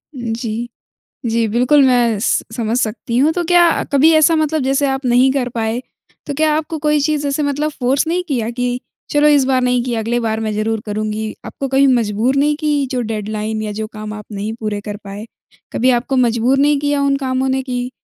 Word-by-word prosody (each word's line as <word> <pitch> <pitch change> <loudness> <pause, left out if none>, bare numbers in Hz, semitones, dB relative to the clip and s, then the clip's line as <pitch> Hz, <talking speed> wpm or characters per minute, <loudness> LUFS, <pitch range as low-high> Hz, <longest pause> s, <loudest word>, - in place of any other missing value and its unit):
उम, 240 -3 -3
जी। 230 0 -4 0.6
जी 230 0 +1
बिल्कुल 250 +6 +3
मैं 240 -4 +2
स 225 - +1
समझ 230 0 -1
सकती 235 0 -2
हूँ। 300 +4 +4
तो 350 +1 -1
क्या 350 +1 +5 0.3
कभी 280 +3 +5
ऐसा 315 +1 +5
मतलब 310 -1 0
जैसे 270 +2 +1
आप 270 0 -2
नहीं 250 +2 +4
कर 260 -3 -1
पाए 225 +1 -1 0.5
तो 285 - -3
क्या 310 +2 +2
आपको 320 +1 -3
कोई 300 0 +1
चीज़ 295 0 0
ऐसे 280 +2 -1
मतलब 290 +2 -1
फ़ोर्स 270 +1 0
नहीं 350 +2 0
किया 235 -6 -1
कि 245 +1 -2 0.3
चलो 295 0 +4
इस 290 -2 +4
बार 260 -1 +2
नहीं 250 -1 +2
किया 240 -3 -2
अगले 235 +2 -1
बार 220 -1 -1
मैं 220 -1 -2
ज़रूर 220 +1 -1
करुँगी? 215 +1 -3
आपको 275 - -5
कभी 270 +1 +3
मजबूर 240 +1 +1
नहीं 295 +1 +2
की 295 -3 +1
जो 250 - -1
डेडलाइन 215 -1 -3
या 210 - -4
जो 215 +1 -4
काम 215 0 -7
आप 210 -1 -8
नहीं 205 +2 -4
पूरे 210 -2 -3
कर 205 0 -6
पाए? 200 +2 -7 0.5
कभी 255 +2 +2
आपको 250 +2 0
मजबूर 245 +1 +2
नहीं 290 +1 +3
किया 290 -1 0
उन 280 0 +2
कामों 265 -1 -1
ने 265 0 0
कि 250 -1 -3
250 Hz, 215 wpm, -17 LUFS, 225-285 Hz, 0.6 s, क्या